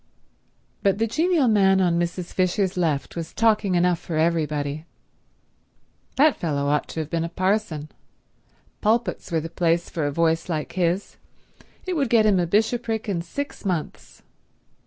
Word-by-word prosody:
But 195 -1 +2
the 225 - +1
genial 315 +4 +2
man 195 -3 +4
on 175 -2 +2
Mrs. 175 +1 -3
Fisher's 185 +1 +1
left 160 -6 -1
was 165 -1 -6
talking 215 -4 +2
enough 175 -1 +2
for 165 - -4
everybody. 155 -2 -1 1.3
That 295 +1 +4
fellow 145 -4 -1
ought 150 0 +1
to 160 - -3
have 155 - -6
been 165 -1 0
a 165 - -3
parson. 185 -4 -1 0.9
Pulpits 220 -5 0
were 165 -1 +1
the 165 - -5
place 170 0 0
for 155 -4 -1
a - - -1
voice 165 +3 +1
like 155 -3 -2
his; 180 +2 -1 0.7
it 370 - -2
would 280 -7 0
get 225 -2 +4
him 200 -3 +4
a 175 - 0
bishopric 220 +3 0
in 185 -5 -1
six 280 +12 -6
months. 180 -6 -4
180 Hz, 155 wpm, -24 LUFS, 165-215 Hz, 1.3 s, man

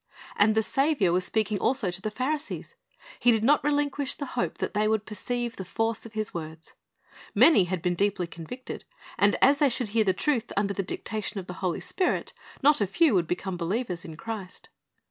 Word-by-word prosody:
And 215 +1 +4
the 220 - +3
Saviour 270 - +2
was 180 0 +2
speaking 215 -2 0
also 235 -6 +1
to 180 +2 -7
the 215 - -2
Pharisees. 285 +7 -3 0.5
He 245 - +4
did 225 -2 +4
not 295 +4 +4
relinquish 285 -1 0
the 285 - -4
hope 245 - -1
that - - -3
they 210 0 +2
would 215 -1 +1
perceive 240 +3 -3
the 190 - -4
force 225 +4 -2
of 225 - -16
His 215 -1 -3
words. 160 -1 -7 0.6
Many 295 - +7
had 180 -1 -3
been 180 -1 +2
deeply 195 0 0
convicted, 170 +10 -8 0.4
and 205 0 +4
as 280 +2 +6
they 290 - +5
should 240 -3 -3
hear 220 +1 +3
the 195 - +3
truth 240 +4 0
under 200 0 +1
the 195 - -1
dictation 210 +2 -4
of 185 - -7
the 180 - -7
Holy 180 -3 -1
Spirit, 370 -2 -1 0.3
not 290 -3 +5
a 205 - +2
few 305 - +3
would 175 -4 +2
become 180 +1 -3
believers 180 0 -2
in 160 -2 -9
Christ. 210 -4 -7
215 Hz, 205 wpm, -27 LUFS, 185-250 Hz, 0.6 s, Many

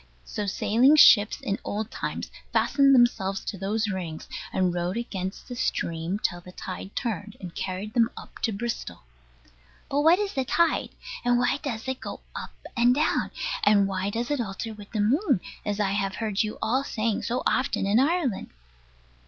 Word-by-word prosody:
So 210 -1 -4
sailing 240 +9 +4
ships, 215 -8 +7
in 200 - -2
old 215 +2 -3
times, - - -4 0.2
fastened 275 -1 +4
themselves 195 -6 +2
to - - -3
those 210 +3 -1
rings, 170 -4 -5 0.2
and 185 -2 +1
rode 175 +3 -1
against 195 -5 -4
the 250 - -6
stream 170 -5 -1
till 175 -4 -2
the 180 - -12
tide 185 +1 -7
turned, 210 -3 -3
and 180 -3 -8
carried 190 +3 -4
them 230 -1 +4
up - - -11
to 225 - 0
Bristol. 230 - -4 0.9
But 285 +1 +2
what 325 +4 +6
is 410 -1 -2
the 265 - 0
tide? 330 +5 +2 0.3
And 245 -1 +3
why 245 +2 +2
does 235 -4 -4
it 260 0 -2
go - - -7
up - - -7 0.2
and 245 0 +4
down? 305 +3 +1 0.3
And 200 -2 +5
why 190 0 -1
does 235 +5 -2
it 290 -4 +1
alter 220 +1 -4
with 205 -1 -12
the 215 - 0
moon, 265 - +3 0.2
as 205 0 -2
I 195 -2 +1
heard 200 +1 -1
you 215 -1 -2
all 255 +5 +1
saying 220 -4 -1
so 245 +2 -2
often 255 - +1
in 205 +4 +4
Ireland? 285 - +1
215 Hz, 175 wpm, -26 LUFS, 195-245 Hz, 0.9 s, ships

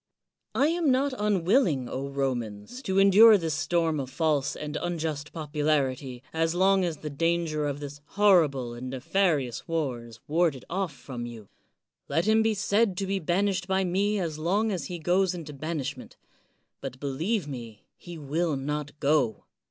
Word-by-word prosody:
I 285 +4 +3
am 335 -2 +1
not 265 +1 +2
un 210 -6 0
willing, 175 - +3
Romans, 130 - -3
to 190 -7 -1
endure 205 +3 +8
this 165 -4 -2
storm 160 0 0
of 130 -2 -4
false 150 0 0
and 150 0 -6
unjust 155 -4 -3
popularity 145 -5 -1
as 165 +1 0
long 190 +1 +4
as 170 -3 -2
the 150 - -6
danger 165 0 0
of 145 0 -3
this 145 0 -8 0.2
horrible 155 -12 +4
and 125 +2 -6
nefarious 135 -1 0
war 145 -8 -2
is 115 -1 -13
warded 155 -4 +1
oflp 190 0 -1
from 125 -5 -7
you. 115 -4 -10 0.6
Let 165 - +1
him 220 +1 +4
be 220 -1 +2
said 200 0 +1
to 195 - -1
be 195 0 -1
banished 185 +2 0
by 190 0 +1
me 200 +4 +1
as 160 -4 -3
long 200 +7 +1
as 175 -7 -3
he 175 +4 -5
goes 180 +3 +1
into 155 -4 -7
banishment; 155 -1 -5 0.6
but, 130 -1 -7
believe 155 +8 -1
me, 120 -6 -8
he 175 -1 -10
will 155 +2 -1
not 150 +2 -4
go. 140 -6 +1
160 Hz, 165 wpm, -27 LUFS, 140-190 Hz, 0.6 s, endure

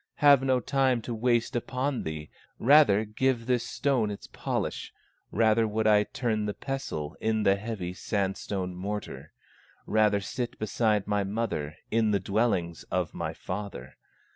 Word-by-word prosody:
Have 145 -3 +6
no 130 -1 +2
time 130 -1 +1
to 120 - -4
waste 120 +2 +1
upon 130 +2 -1
thee, 80 -1 -6 0.3
Rather 120 -6 +5
give 115 +2 0
this 125 -1 +1
stone 125 -3 0
its 100 - -7
polish, - - -3 0.4
Rather 110 0 +3
would 110 +1 -1
I 105 -1 +5
turn 110 -4 -1
the 105 - -3
pestle 90 - -4
In 110 -1 +1
the 100 -1 +4
heavy 100 -4 -5
sandstone 95 -1 -2
mortar; 90 -6 -5 0.5
Rather 105 -1 +3
sit 120 +4 -4
beside 110 -1 +1
my 105 -1 0
mother 95 -8 -3
In 110 -1 +3
the 100 -1 +2
dwellings 95 -4 0
of 90 -3 -1
my - - -4
father. 90 -10 -6
110 Hz, 145 wpm, -28 LUFS, 100-120 Hz, 0.5 s, Have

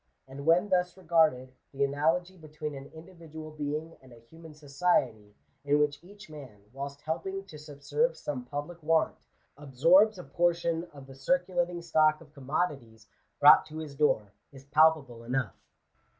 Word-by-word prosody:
And 140 +3 -9
when 180 +5 +4
thus 180 -1 0
regarded, 155 -8 +1 0.2
the 140 0 -1
analogy 160 +6 0
between 155 -2 -7
an 135 0 -9
individual 160 -2 -11
being 150 +2 -5
and 130 -1 -18
a - - -13
human 160 +7 -15
society, 135 -8 -1 0.3
in 145 +1 +2
whioh 150 +1 0
each 205 +3 -14
man, 135 -10 -12
whilst 140 +1 -7
helping 190 +5 -4
to 155 -6 -12
subserve 150 - -2
some 130 -4 -5
public 145 +6 -6
want, 160 +1 +1 0.4
absorbs 165 - +4
a 180 - -8
portion 170 -1 0
of 140 -5 -14
the 135 - -13
circulating 175 - -1
stock 155 -2 +3
of 150 -2 -18
commodities 135 -6 -4 0.3
brought 145 +1 +8
to 155 0 -9
his 155 -3 -7
door, 110 -9 +1 0.2
is 135 -1 -15
palpable 145 -5 +2
enough. 125 +2 -2
155 Hz, 150 wpm, -29 LUFS, 140-170 Hz, 0.4 s, brought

